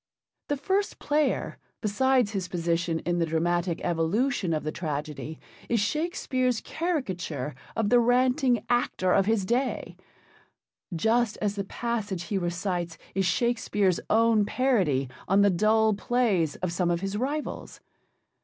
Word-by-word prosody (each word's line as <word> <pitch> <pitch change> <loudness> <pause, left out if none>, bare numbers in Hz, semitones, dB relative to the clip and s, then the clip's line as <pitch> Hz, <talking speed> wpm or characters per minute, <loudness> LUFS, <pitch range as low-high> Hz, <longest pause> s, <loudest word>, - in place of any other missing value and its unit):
The 290 - -1
First 385 +8 -1
Player, 300 0 0 0.2
besides 245 +1 +2
his 195 -4 -3
position 170 -1 -1
in 175 0 -1
the 165 - +2
dramatic 170 +2 0
evolution 180 +5 0
of 155 -1 -1
the 155 - -2
tragedy, 155 -1 -5 0.3
is 235 - +2
Shakespeare's 255 - 0
caricature 185 - -3 0.2
of 220 -2 +1
the 245 - +7
ranting 250 0 +2
actor 240 -6 +1
of 195 0 +3
his 220 -3 +2
day, 250 +6 -1 1.0
just 220 +5 +1
as 205 -1 0
the 200 -1 -3
passage 205 -4 -3
he 195 +2 -2
recites 175 -1 -2 0.2
is 195 -1 +1
Shakespeare's 205 -3 +1
own 225 -1 +4
parody 200 - +1 0.2
on 195 +2 +4
the 200 - +5
dull 215 +4 +3
plays 200 -7 +1
of 180 -2 -3
some 175 0 +1
of 170 0 0
his 195 +1 -3
rivals. 285 +7 -3
205 Hz, 135 wpm, -27 LUFS, 175-245 Hz, 1.0 s, the